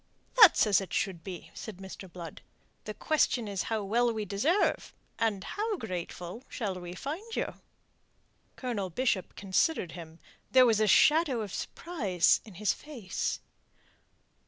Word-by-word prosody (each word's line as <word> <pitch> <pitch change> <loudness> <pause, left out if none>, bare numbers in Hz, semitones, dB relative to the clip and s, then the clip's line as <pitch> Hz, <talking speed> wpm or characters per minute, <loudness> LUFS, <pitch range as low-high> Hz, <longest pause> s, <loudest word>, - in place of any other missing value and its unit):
"That's 405 - +9
as 205 -2 +4
it 195 - -7
should 185 -5 -1
be," 185 -3 -8
said 220 -5 -8
Mr. 190 -1 -10
Blood. 170 -3 -9 0.4
"The 215 - -5
question 255 -4 +1
is 200 -2 -2
how 220 -2 -1
well 235 +4 +2
we 215 -2 -3
deserve, 275 - +1 0.2
and 210 -4 0
how 425 0 -2
grateful 180 - -6
shall 205 -5 -3
we 175 0 -7
find 350 - -5
you?" - - -2 1.0
Colonel 225 -7 -3
Bishop 195 0 -1
considered 195 - 0
him. 165 -2 -10 0.3
There 255 -1 +7
was 225 -3 +3
a 215 - +3
shadow 295 - +5
of 205 -3 -6
surprise 205 - +1
in 210 -5 -13
his 210 +3 +1
face. 250 -11 -4
210 Hz, 145 wpm, -30 LUFS, 185-255 Hz, 1.0 s, That's